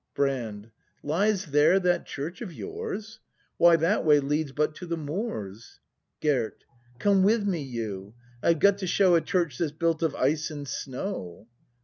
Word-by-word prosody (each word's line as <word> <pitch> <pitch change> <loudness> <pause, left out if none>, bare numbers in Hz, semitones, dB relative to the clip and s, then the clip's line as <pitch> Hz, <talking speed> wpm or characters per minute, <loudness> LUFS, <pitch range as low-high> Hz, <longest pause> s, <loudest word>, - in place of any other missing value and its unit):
Brand. 115 -6 -2 0.3
Lies 195 +6 +1
there 150 +5 +4
that 180 -2 +1
church 160 +6 -6
of 210 -7 -5
yours? 400 - -6 0.4
Why, 170 0 +7
that 165 +6 +1
way 150 -2 +6
leads 145 +1 -1
but 150 +2 0
to 180 - -8
the 170 0 -2
moors. 145 - -5 0.4
Gerd. 130 -7 0 0.3
Come 200 +6 +3
with 210 +2 +3
me, 180 -6 0
you; 110 -6 -5 0.3
I've 170 - +3
got 200 +5 +4
to 190 - -3
show 185 0 +4
A 165 - +5
church 170 -9 -1
that's 160 -4 0
built 165 +1 0
of 160 -4 0
ice 150 +5 +1
and 145 -2 -7
snow! 130 - -5
160 Hz, 160 wpm, -27 LUFS, 135-190 Hz, 0.4 s, Why